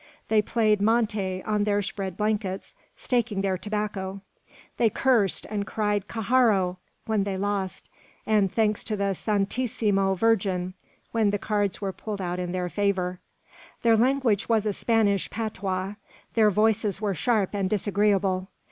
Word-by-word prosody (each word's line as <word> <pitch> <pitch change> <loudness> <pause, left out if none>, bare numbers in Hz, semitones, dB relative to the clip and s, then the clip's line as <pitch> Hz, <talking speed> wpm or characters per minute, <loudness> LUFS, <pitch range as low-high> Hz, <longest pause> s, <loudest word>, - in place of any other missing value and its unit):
They 220 -1 +4
played 215 -1 +1
monte 210 -4 +1
on 210 -1 0
their 205 0 +1
spread 190 -2 -4
blankets, 210 -3 -2 0.2
staking 235 -5 -1
their 195 -1 0
tobacco. 200 -1 -3 0.6
They 230 - +4
cursed, 225 -5 +2
and 205 -2 -3
cried 210 -2 -1
"Carrajo!" 220 -5 +2 0.3
when 215 -2 +1
they 195 -1 -2
lost, 200 -1 -2 0.4
and 210 -3 +2
thanks 215 -2 +1
to 215 - -2
the 200 0 0
"Santisima 200 -1 0
Virgin" 190 -4 +1 0.4
when 225 -3 +2
the 205 - +1
cards 205 -1 -1
were 195 -1 -2
pulled 210 0 -6
out 180 -1 -3
in 180 -1 -3
their 180 0 -2
favour! 185 -2 -1 0.6
Their 230 -1 +5
language 240 -3 +2
was 220 -2 +2
a 210 - 0
Spanish 205 -3 +1
patois; 195 -3 -3 0.4
their 220 -2 +5
voices 210 -1 +1
were 210 -2 0
sharp 210 +2 +1
and 195 -2 0
disagreeable. 200 -2 +1
205 Hz, 145 wpm, -26 LUFS, 195-220 Hz, 0.6 s, Their